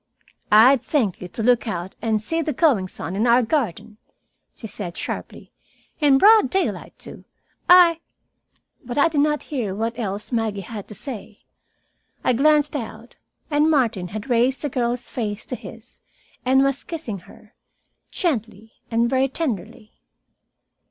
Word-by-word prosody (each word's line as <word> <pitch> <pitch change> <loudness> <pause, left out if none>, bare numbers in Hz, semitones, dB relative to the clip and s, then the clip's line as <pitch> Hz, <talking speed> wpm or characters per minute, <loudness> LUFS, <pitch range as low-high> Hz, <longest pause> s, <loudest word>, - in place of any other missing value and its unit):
"I'd 240 +5 +7
thank 230 - -1
you 180 - -6
to 220 +5 -6
look 245 0 +3
out 180 -2 -4
and 220 -2 +1
see 325 +10 -2
the 310 -1 -2
goings 235 - +1
on 175 +5 -4
in 220 +5 +1
our 240 +1 +5
garden," 225 - -2 0.6
she - - -11
said 190 -5 -7
sharply. - - -6 0.5
"In 285 -4 +5
broad 425 - +6
daylight, 385 +6 -2
too. - - -11 0.5
I 350 -2 +7 0.4
" - - -44
But 245 +1 -6
I 290 +3 +4
did 300 -3 +1
not 300 0 +1
hear 215 -9 -2
what 230 +3 -3
else 205 0 -4
Maggie 220 -4 -1
had 205 +1 -8
to 210 - -8
say. 220 -2 -7 0.8
I 255 - +3
glanced 295 +3 +3
out, 235 -2 -7 0.3
and 300 +2 +3
Martin 235 - +1
had 205 +5 -7
raised 250 +2 +1
the 290 - -1
girl's 245 -1 -2
face 215 -3 -4
to 250 - -5
his 230 0 -13 0.4
and 265 +1 +4
was 275 0 0
kissing 300 - -6
her, - - -18 0.6
gently 225 - -3 0.2
and 230 +1 +2
very 260 +2 +2
tenderly. 235 - -5
240 Hz, 155 wpm, -22 LUFS, 215-285 Hz, 0.8 s, I'd